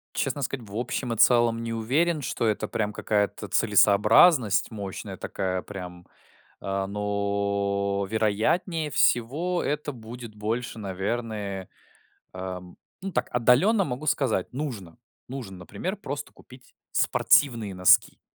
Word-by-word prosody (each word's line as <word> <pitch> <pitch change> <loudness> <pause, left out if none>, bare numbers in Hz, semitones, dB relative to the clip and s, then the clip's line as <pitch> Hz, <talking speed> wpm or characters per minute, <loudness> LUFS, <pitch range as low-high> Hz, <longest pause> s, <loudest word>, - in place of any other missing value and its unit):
Честно 145 - -1
сказать, 125 -3 -4
в 100 - -10
общем 120 +1 -2
и - - -6
целом 115 0 +4
не 115 - -4
уверен, 145 +9 +1
что 125 -3 -2
это 110 -2 0
прям 105 -1 -2
какая-то 105 -1 -1
целесообразность 105 - +5
мощная 100 -4 -6
такая, 95 -1 -3
прям, 90 -3 -9 0.6
а, 95 0 -2
но, 100 -1 -1
вероятнее 130 - 0
всего, 150 +12 +2
это 150 +1 -2
будет 115 -1 -10
больше, 115 +3 -3
наверное, 100 -1 -4 0.6
ам, 90 -1 -7 0.3
ну, 195 - -3
так - - -1
отдаленно 130 - +4
могу 135 0 -5
сказать: 125 -10 0
нужно, 120 - -5 0.3
нужно, 125 -8 -7
например, 180 - -5
просто 145 -6 -6
купить 130 0 -17 0.2
спортивные 115 -8 +3
носки. 90 0 +4
110 Hz, 120 wpm, -26 LUFS, 100-130 Hz, 0.6 s, целесообразность